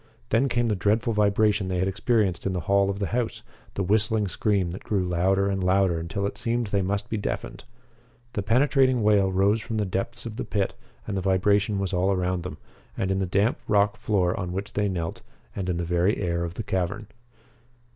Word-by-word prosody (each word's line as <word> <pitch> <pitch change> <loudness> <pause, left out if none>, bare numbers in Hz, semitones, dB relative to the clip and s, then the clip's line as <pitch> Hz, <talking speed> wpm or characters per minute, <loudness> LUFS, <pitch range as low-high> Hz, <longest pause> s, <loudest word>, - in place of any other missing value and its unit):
Then 135 +4 +2
came 120 0 +1
the 105 - +1
dreadful 110 +4 +1
vibration 105 -1 +2
they 90 -1 -1
had 95 +2 +1
experienced 95 -2 0
in 95 - -1
the 90 - -2
hall 100 +4 +2
of 100 - -2
the 100 - -1
house 120 -2 -2 0.3
the 100 - -1
whistling 105 +2 +2
scream 95 -2 0
that 90 - -8
grew 100 -3 0
louder 95 +3 +2
and 95 -1 -1
louder 95 -2 +2
until 100 +5 -3
it 100 - -4
seemed 120 +1 0
they 100 -1 0
must 100 +2 -2
be 110 - -2
deafened. 105 - -4 0.7
The 105 - -1
penetrating 130 +2 +3
wail 100 -2 +4
rose 100 +4 +2
from 110 0 -4
the 105 - +1
depths 100 +6 -3
of 115 -1 -6
the - - -2
pit, 100 -2 -1 0.3
and 105 - -3
the 95 - -1
vibration 100 +2 +2
was 95 0 -2
all 90 +2 +2
around 90 -1 0
them, 85 -3 -7 0.4
in 95 0 0
the 95 - -1
damp 100 +6 +1
rock 105 0 +3
floor 90 -4 0
on 90 -2 -3
which 100 +2 -4
they 105 0 +1
knelt, 85 -3 -4 0.3
and 95 -2 -3
in 90 - 0
the 85 - -2
very 90 +4 +1
air 85 -2 -1
of 85 0 -6
the 115 - -4
cavern. 95 +1 -2
100 Hz, 210 wpm, -25 LUFS, 95-105 Hz, 0.7 s, wail